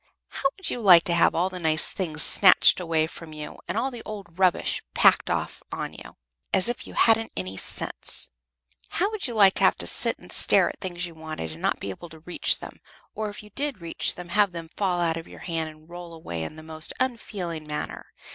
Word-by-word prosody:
How 275 - 0
would 380 - -2
you 245 - -4
like 180 -5 +8
to 170 - 0
have 170 - +3
all 180 +3 +1
the 180 - -6
nice 160 -2 +4
things 155 -6 -2
snatched 190 -1 +6
away 165 -3 +1
from 160 -1 -10
you, 150 -1 -8
and - - -3
all 260 +4 0
the 240 -2 -8
old 195 -5 -9
rubbish 185 -2 +2
packed - - +5
off - - -3
on - - -4
you, - - -13 0.3
as 190 - +3
if 240 +1 -2
you - - -11
hadn't 225 0 +3
any 95 +1 -4
sense? 65 - -4 0.6
How 390 +5 0
would 430 -8 -2
you 240 - -6
like 200 -3 +6
to - - +1
have - - +4
to - - -4
sit - - +2
and - - -14
stare - - +3
at - - -10
things 180 -2 -3
you 170 - -8
wanted, 155 - -7
and 80 - -11
not - - +1
to - - -23
be 100 - -4
able 170 - -10
to 160 0 -13
reach 175 +2 +3
them, - - -11 0.3
or, 215 -1 -3
if 205 - -9
you 210 - -15
did 280 0 -2
reach 170 -1 +2
them, 180 -1 -9
have 205 0 +2
them 165 -1 -7
fall 185 -3 0
out 165 -1 0
of 165 - -8
your - - -13
hand, 165 -2 -3
and 155 0 -17
roll 175 -1 -9
away 85 - -6
in 80 - -6
the 155 - -11
most 160 0 -4
unfeeling 195 -11 -3
manner? 150 0 -5
175 Hz, 235 wpm, -25 LUFS, 160-205 Hz, 0.6 s, like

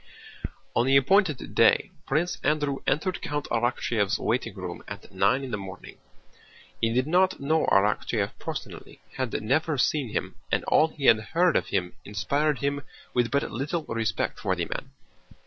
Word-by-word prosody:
On 120 - +3
the 135 +1 +6
appointed 155 +1 +2
day - - +4 0.2
Prince 160 +5 0
Andrew 145 -1 +1
entered 180 +5 0
Count 145 0 -3
Arakchéev's 115 -3 +1
waiting 120 +1 -1
room 90 -3 -6
at - - -9
nine 135 +2 +2
in 130 - -5
the 105 - -1
morning. 95 -1 -10 0.8
He 115 - +2
did 125 +2 +1
not 185 +4 +2
know 155 +3 +1
Arakchéev 105 +2 +2
personally, - - -7 0.2
had 130 -3 -1
never 150 +6 +1
seen 135 -1 +1
him, - - -3 0.2
and - - +1
all 155 - +4
he 150 -3 -6
had 115 - +7
heard 165 +10 +2
of - - +1
him 90 -2 -1
inspired 140 +9 0
him 140 0 -1 0.3
with 120 -2 +2
but 140 +1 +1
little 145 +7 -2
respect 115 -1 -2
for - - 0
the - - -2
man. - - -5
135 Hz, 165 wpm, -26 LUFS, 115-155 Hz, 0.8 s, had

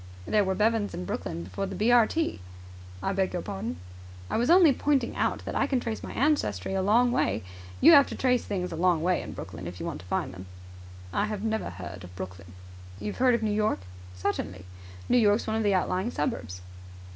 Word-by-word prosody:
"There 210 -1 +3
were 190 -1 0
Bevans 215 +1 +1
in 90 - -5
Brooklyn 85 -1 -4
before 95 - -4
the 195 - -6
B.R.T." 240 - +3 0.6
"I 195 - 0
beg 190 -1 0
your 175 - -3
pardon?" 85 -3 -4 0.5
"I - - +1
was 240 +2 +1
only 345 -4 +7
pointing 270 -3 0
out - - -1
that - - -4
I 275 - +1
can 265 -3 +1
trace 225 -2 -4
my - - -7
ancestry 240 - 0
a 190 - +1
long 235 +5 +4
way. 105 - 0 0.4
You 320 - +9
have 285 -3 +8
to - - -6
trace 250 -2 +2
things 180 -3 -3
a - - -4
long 170 -1 +2
way 180 +1 +2
in - - -7
Brooklyn, 85 +2 -7
if 90 +1 -8
you - - -4
want - - -4
to 90 - -15
find 90 - -2
them." 95 0 -10 0.7
"I 205 - +1
have 210 -1 -4
never 220 0 -1
heard 90 +1 -8
of 90 0 -12
Brooklyn." 90 -2 -8 0.5
"You've 105 +1 -5
heard 250 -1 +4
of 230 - -2
New 215 - +1
York?" 210 - +1 0.3
"Certainly." 90 0 -3 0.4
"New 245 - +4
York's 210 0 +3
one 220 - -1
of - - 0
the 205 -2 +2
outlying 185 +3 0
suburbs." 95 - -3
200 Hz, 215 wpm, -27 LUFS, -, 0.7 s, You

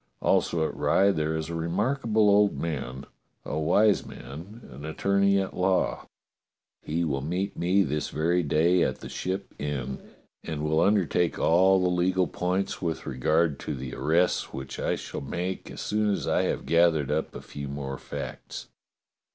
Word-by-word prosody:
Also 80 -2 +2
at - - -7
Rye 100 +1 +3
there 80 -2 -1
is 80 -1 -3
a - - -4
remarkable 105 +7 +1
old 100 0 +4
man, 65 -5 -4 0.4
a 75 - -2
wise 100 +6 +3
man, 85 - -10
an 70 +3 -10
attorney 100 +5 +2
at 95 -1 -2
law. 90 0 +1 0.7
He 85 +3 -1
will 70 -4 -1
meet 90 +7 -2
me 95 +3 +3
this 75 -1 -2
very 85 +3 +1
day 85 +3 +3
at - - 0
the - - -7
Ship 95 +1 -4
Inn, 65 -3 -3 0.4
and 75 -2 -4
will 80 +1 +2
undertake 90 -3 +2
all 95 +3 +4
the 90 0 +2
legal 90 +1 +2
points 90 +3 -2
with 85 -3 -2
regard 75 +4 +1
to 75 - -4
the 65 -2 -6
arrests 80 +7 +1
which 65 0 -7
I - - 0
shall - - -6
make 90 +7 -4
as - - -7
soon 105 0 0
as 100 - -2
I - - +2
have - - -2
gathered 85 -4 +3
up 80 - -2
a - - -5
few 70 -1 -7
more 70 -1 -5
facts. - - -7
85 Hz, 170 wpm, -27 LUFS, 75-95 Hz, 0.7 s, old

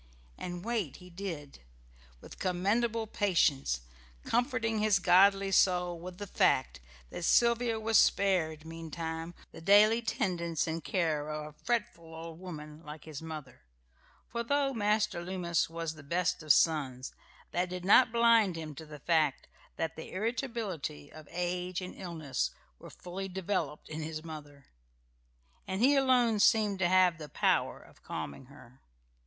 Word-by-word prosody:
And 175 +1 -6
wait 220 - -2
he 180 0 -13
did, 170 -6 -6 0.6
with - - -12
commendable 215 +5 0
patience, 70 - +1 0.4
comforting 230 -2 0
his 210 -2 +4
godly 195 +1 +5
soul 180 -2 +3
with 180 +1 -8
the 205 - -5
fact 130 - +1 0.3
that - - -6
Sylvia 235 +3 +3
was 220 0 +4
spared 160 -6 +2
meantime 165 +1 -6 0.2
the - - -11
daily 210 +5 +6
tendance 170 -7 -1
and 165 0 -3
care 155 -5 -1
of 150 0 -4
a - - -31
fretful 170 -9 -2
old 165 0 -8
woman 155 -4 -9
like 150 0 -9
his 155 -2 -8
mother; 155 - -8 0.7
for, 235 - -3
though 275 +3 +1
Master 210 -4 +1
Loomis 175 -3 -1
was 165 -1 -4
the 155 - -12
best 175 +5 -1
of 155 -1 +2
sons, 135 -5 +2 0.4
that 180 +1 0
did 180 0 -6
not 235 +5 +6
blind 230 -5 +4
him 160 -2 -6
to 155 +2 -10
the 150 -1 -9
fact 155 -4 +1 0.3
that 165 - -3
the 160 - -8
irritability 215 - -3
of 155 -1 -12
age 180 +1 -2
and 185 -1 -7
illness 155 -7 -3 0.3
were - - -11
fully 185 +2 -7
developed 185 -4 -3
in 155 +1 -5
his 155 0 -5
mother, 145 -3 -10 1.0
and 190 0 -2
he 280 +3 +6
alone 250 -5 +3
seemed 210 -2 +3
to 175 -2 +2
have 185 -2 +4
the 150 -1 -8
power - - +1
of - - -19
calming 70 - -6
her. 130 -1 -17
175 Hz, 150 wpm, -31 LUFS, 160-205 Hz, 1.0 s, daily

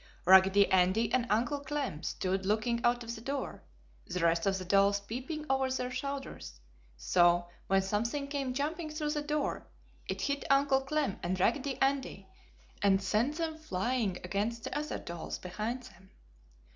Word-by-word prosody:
Raggedy 190 +2 +7
Andy 190 +5 +3
and 250 -1 +2
Uncle 240 +7 +1
Clem 280 - -3
stood 190 +2 -2
looking 220 +4 0
out 240 0 +2
of 230 0 -5
the 220 - -8
door, 275 +2 -4 0.5
the 180 - -3
rest 170 +1 +2
of 195 0 +2
the 185 - -6
dolls 200 +2 +4
peeping 260 +9 -5
over 265 0 +1
their 255 -1 -2
shoulders, 275 - -5 0.4
so 175 - +3 0.2
when 195 0 +3
something 230 +8 -1
came 275 -3 -3
jumping 310 +4 -2
through 305 -1 -2
the 300 -1 -1
door, 295 0 -2 0.4
it - - -3
hit 280 0 -1
Uncle 275 -1 +4
Clem 285 -5 -1
and 185 +2 -2
Raggedy 265 +7 +1
Andy 270 -8 0 0.5
and 195 -1 +4
sent 230 +9 0
them 320 -1 -3
flying 225 - -1
against 210 +5 -2
the - - -5
other 300 +1 -2
dolls 170 -1 -6
behind 215 +7 -4
them. 190 -5 -16
235 Hz, 160 wpm, -31 LUFS, 195-280 Hz, 0.5 s, Raggedy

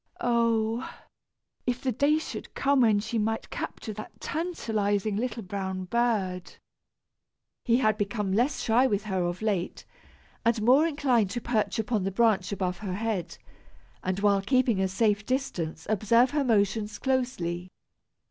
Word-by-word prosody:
Oh! 230 0 +1 0.8
if 245 0 0
the 260 -1 -1
day 285 +6 +3
should 315 - -7
come, 275 -1 +3
when 220 -4 +4
she 230 +2 -2
might 225 +1 -2
capture 215 - -5
that 215 +1 -10
tantalizing 215 - -1
little 230 0 -2
brown 190 0 -4
bird! 195 -4 -1 1.1
He 235 -1 +4
had 215 -4 +2
become 205 -1 -1
less 245 +7 +1
shy 240 +4 +4
with 205 -4 0
her 190 -3 -1
of 175 +3 -2
late, 195 -5 -2 0.6
and 230 -1 +2
more 270 +8 +5
inclined 260 - +1
to 240 +5 -4
perch 225 -2 0
upon 220 -1 0
the 195 - 0
branch 200 -2 +2
above 185 -2 -2
her 190 -4 -4
head, 210 -4 -3 0.7
and, 185 +1 -1
while 200 -1 +3
keeping 240 -1 +2
a 190 - +2
safe 205 +2 +1
distance, 200 - -3
observe 230 +4 +3
her 295 -1 +1
motions 210 -2 +1
closely. 185 -10 -1
220 Hz, 145 wpm, -27 LUFS, 195-245 Hz, 1.1 s, more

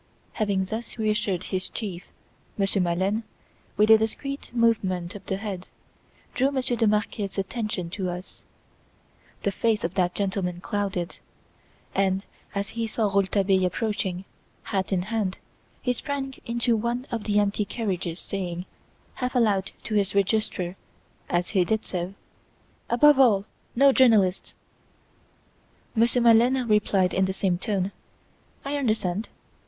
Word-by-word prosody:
Having 200 -3 0
thus 225 +5 -5
reassured 210 -4 0
his 185 -1 -2
chief, 190 -5 -5 0.5
Monsieur 195 -1 +2
Maleine, 185 +5 +1 0.6
with 215 +1 +5
a 220 - +9
discreet 275 +6 -3
movement 205 -7 +1
of 205 - -9
the 190 - -1
head, 195 -3 -5 0.7
drew 265 +2 +2
Monsieur 260 -3 0
de 225 -1 +2
Marquet's 210 -1 -1
attention 195 -3 -2
to 190 -1 -2
us. 180 +1 -8 1.0
The 200 - +1
face 220 +2 +1
of 170 - -1
that 180 -2 +1
gentleman 190 -3 -1
clouded, 190 -2 -3 0.7
and, 195 0 +1 0.3
as 200 0 -1
he 230 -1 -2
saw 215 -1 0
Rouletabille 195 -1 +2
approaching, 190 -1 -1 0.4
hat 190 -2 -2
in 180 -2 +1
hand, 210 -2 -1 0.5
he 250 - +2
sprang 270 +2 -3
into 235 0 +1
one 235 +3 -1
of 230 -3 -3
the 205 -1 +1
empty 205 0 +2
carriages 190 -6 -3
saying, 180 -2 -4 0.6
half 250 0 -1
aloud 205 -5 +2
to 220 - -4
his 200 -2 +1
Registrar, 195 -3 0 0.5
as 175 +1 0
he 190 -4 +3
did 220 +4 -1
so, 180 +1 -3 0.7
"Above 280 +4 +6
all, 210 -7 +5 0.3
no 275 +3 +6
journalists!" 220 -8 +3 1.4
Monsieur 235 +2 +3
Maleine 240 +2 +5
replied 200 -3 +3
in 190 - +3
the 190 - -1
same 185 -2 0
tone, 195 -2 -1 0.7
"I 285 +1 -1
understand!" 215 -6 0
205 Hz, 135 wpm, -26 LUFS, 190-230 Hz, 1.4 s, a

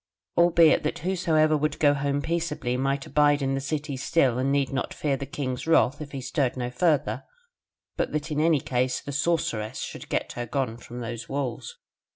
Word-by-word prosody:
Albeit 170 -2 +5
that 150 - -2
whosoever 165 -4 +2
would 150 0 0
go 145 -2 +4
home 145 0 -1
peaceably 160 -7 -1
might 135 +1 -1
abide 145 -1 +3
in 135 0 0
the 135 - -1
city 145 0 -3
still 130 -2 +2
and 135 +2 +1
need 140 -1 +1
not 130 - -2
fear 145 -2 0
the 140 0 -6
king's 130 0 -4
wrath 155 -3 +3
if 145 -2 -7
he 140 - -5
stirred 130 0 -1
no 125 -1 -3
further: 150 +3 +1 0.7
but - - -1
that 155 +1 -3
in 150 - 0
any 155 -3 +3
case 125 0 0
the 140 - -7
Sorceress 140 -8 -1
should - - -6
get - - -1
her 120 0 -5
gone 120 -2 -2
from 120 +1 -9
those 115 0 -6
walls. 140 - -4
140 Hz, 195 wpm, -26 LUFS, 130-155 Hz, 0.7 s, Albeit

